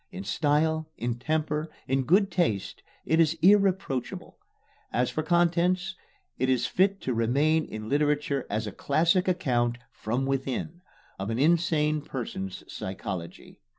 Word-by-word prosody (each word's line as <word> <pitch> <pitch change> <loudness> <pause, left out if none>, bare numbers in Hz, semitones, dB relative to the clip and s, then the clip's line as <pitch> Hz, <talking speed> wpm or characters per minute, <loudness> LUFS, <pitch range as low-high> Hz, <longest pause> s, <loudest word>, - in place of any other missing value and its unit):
In 190 0 -6
style, 160 -1 +1
in 120 0 -3
temper, 155 +2 -1 0.2
in 135 0 +1
good 195 +6 +3
taste, 110 - -1 0.2
it 160 - +2
is 165 0 +3
irreproachable. 190 -9 +2 0.6
As 125 +1 +1
for 155 - -1
contents, 175 +3 +2 0.5
it 130 +1 +1
is 130 -2 +2
fit 195 +1 +1
to 130 - -1
remain 140 +8 +2
in 110 0 -7
literature 145 0 0
as 110 +2 -1
a 105 - -4
classic 170 - +1
account 120 -9 +1
"from 120 +5 -2
within" 135 +5 -3 0.4
of 95 +2 -3
an 115 - -1
insane 155 0 +2
person's 105 -9 -5
psychology. 95 -2 -7
150 Hz, 135 wpm, -27 LUFS, 125-170 Hz, 0.6 s, good